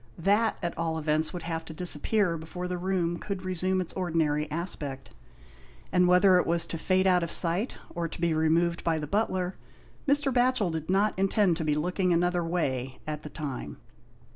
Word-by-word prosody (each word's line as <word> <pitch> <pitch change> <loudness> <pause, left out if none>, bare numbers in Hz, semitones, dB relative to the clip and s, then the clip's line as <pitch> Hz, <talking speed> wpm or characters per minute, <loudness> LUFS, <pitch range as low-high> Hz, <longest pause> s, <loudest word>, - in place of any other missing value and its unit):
That, 205 +6 +2
at 170 - -2
all 165 -1 -1
events 155 0 0
would 180 -2 -6
have 165 -1 -3
to 160 - -9
disappear 180 +3 +3
before 165 +3 -6
the 180 0 -3
room 175 -2 -1
could 200 -3 -5
resume 185 +1 0
its 180 - -4
ordinary 160 -4 0
aspect; 150 -5 -5 0.8
and 180 0 +4
whether 180 +1 +6
it - - -1
was 170 0 +2
to 165 - -5
fade 185 +2 +2
out 180 -1 +4
of 170 - -2
sight 180 +9 -1 0.2
or 170 -1 -2
to 165 - -10
be 170 -1 +1
removed 165 +2 +1
by 165 -1 +1
the 150 - -3
butler, 185 0 -1 0.5
Mr. 285 -1 +2
Batchel 245 -6 +2
did 160 0 -5
not 200 +2 +2
intend 195 -2 +3
to 165 - -2
be 150 -1 +1
looking 180 +4 0
another 175 +1 +2
way 135 -7 -2
at 150 -1 -4
the 150 - -8
time. 145 -5 -6
175 Hz, 190 wpm, -28 LUFS, 160-185 Hz, 0.8 s, whether